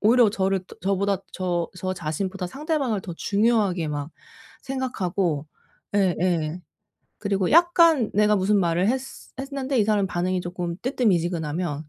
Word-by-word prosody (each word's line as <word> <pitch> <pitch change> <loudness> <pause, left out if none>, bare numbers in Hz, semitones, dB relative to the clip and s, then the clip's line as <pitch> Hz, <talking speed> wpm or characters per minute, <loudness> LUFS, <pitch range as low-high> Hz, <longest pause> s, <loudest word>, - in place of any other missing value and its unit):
오히려 230 0 +5
저를 190 -2 0 0.2
저보다 195 0 +1
저 175 -2 -1
저 185 0 -2
자신보다 185 +3 -3
상대방을 275 - -1
더 175 - -6
중요하게 200 -5 +1
막 145 +1 -4 0.5
생각하고 190 - -2 0.5
예예. 175 -4 +1 0.6
그리고 195 -3 0
약간 335 -6 +5
내가 210 +1 +4
무슨 200 +2 +2
말을 175 +2 +1
했스 265 +1 -5
했는데 275 -1 -2
이 - - +5
사람 210 -3 +2
반응이 180 +1 -1
쪼끔 175 -1 -4
뜨뜻미지근하면 175 - 0
195 Hz, 310 characters per minute, -24 LUFS, 175-230 Hz, 0.6 s, 오히려